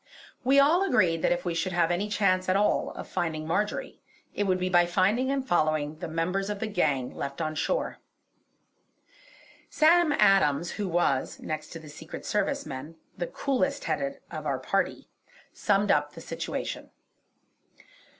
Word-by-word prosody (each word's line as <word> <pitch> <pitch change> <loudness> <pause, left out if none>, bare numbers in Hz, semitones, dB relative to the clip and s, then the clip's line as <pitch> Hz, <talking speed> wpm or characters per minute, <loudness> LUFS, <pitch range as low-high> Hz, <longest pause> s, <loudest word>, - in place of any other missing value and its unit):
We 270 +3 +5
all 310 +6 +5
agreed 170 - +2
that - - +2
if 175 - -1
we 175 - -1
should 165 +2 -1
have 175 -1 +2
any 195 +4 -1
chance 185 -3 +1
at 185 - +3
all 205 +1 +2
of - - -7
finding 165 -4 -2
Marjory, 210 - -2 0.3
it 205 - -1
would 185 -1 +2
be 185 0 -1
by 175 -1 +4
finding 210 +9 +2
and 270 -1 -1
following 155 -2 +1
the 175 - -4
members 180 +5 -1
of 205 -1 -3
the 225 - -2
gang 145 - 0
left 140 +2 -5
on 155 -1 -1
shore. - - -1 1.7
Sam 330 +1 +4
Adams 170 - +3
who 205 -3 -3
was, 165 -6 0
next 155 0 -5
to 165 - -7
the 160 - -13
Secret 155 +2 -9
Service 280 +7 -1
men, 145 +5 -7 0.2
the 175 - -3
coolest 275 0 -1
headed 275 0 -2
of - - -5
our - - 0
party, - - -1 0.5
summed 205 -1 +2
up 145 0 +1
the - - -10
situation. - - -5
185 Hz, 165 wpm, -27 LUFS, 160-210 Hz, 1.7 s, We